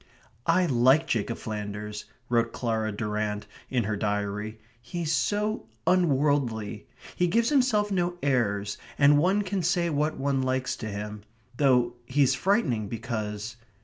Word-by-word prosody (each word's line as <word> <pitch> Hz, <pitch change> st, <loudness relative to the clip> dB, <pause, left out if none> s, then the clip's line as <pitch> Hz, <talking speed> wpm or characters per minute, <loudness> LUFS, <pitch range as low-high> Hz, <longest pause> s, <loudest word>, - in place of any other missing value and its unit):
"I 180 Hz, +2 st, +4 dB
like 130 Hz, +2 st, +4 dB
Jacob 115 Hz, -4 st, -1 dB
Flanders," 105 Hz, -1 st, -5 dB, 0.2 s
wrote 115 Hz, -1 st, +1 dB
Clara 110 Hz, -2 st, -1 dB
Durrant 105 Hz, 0 st, -2 dB, 0.2 s
in 125 Hz, -3 st, +1 dB
her 105 Hz, +1 st, -1 dB
diary. 105 Hz, +1 st, -2 dB, 0.2 s
"He 170 Hz, +8 st, -5 dB
is 155 Hz, -, -1 dB
so 210 Hz, +6 st, 0 dB, 0.2 s
unworldly. 140 Hz, -, +1 dB, 0.3 s
He 180 Hz, -, +2 dB
gives 230 Hz, +6 st, +2 dB
himself 250 Hz, -7 st, +2 dB
no 175 Hz, -2 st, 0 dB
airs, 105 Hz, -7 st, 0 dB, 0.2 s
and 145 Hz, 0 st, +6 dB
one 190 Hz, +6 st, +2 dB
can 195 Hz, -1 st, -2 dB
say 170 Hz, 0 st, +1 dB
what 150 Hz, +1 st, 0 dB
one 135 Hz, -1 st, 0 dB
likes 130 Hz, 0 st, -1 dB
to 110 Hz, -, -5 dB
him, 105 Hz, 0 st, -5 dB, 0.3 s
though 125 Hz, -3 st, +3 dB
he's 135 Hz, 0 st, +3 dB
frightening 135 Hz, -, +1 dB
because 110 Hz, -1 st, -4 dB
125 Hz, 140 wpm, -27 LUFS, 105-165 Hz, 0.3 s, and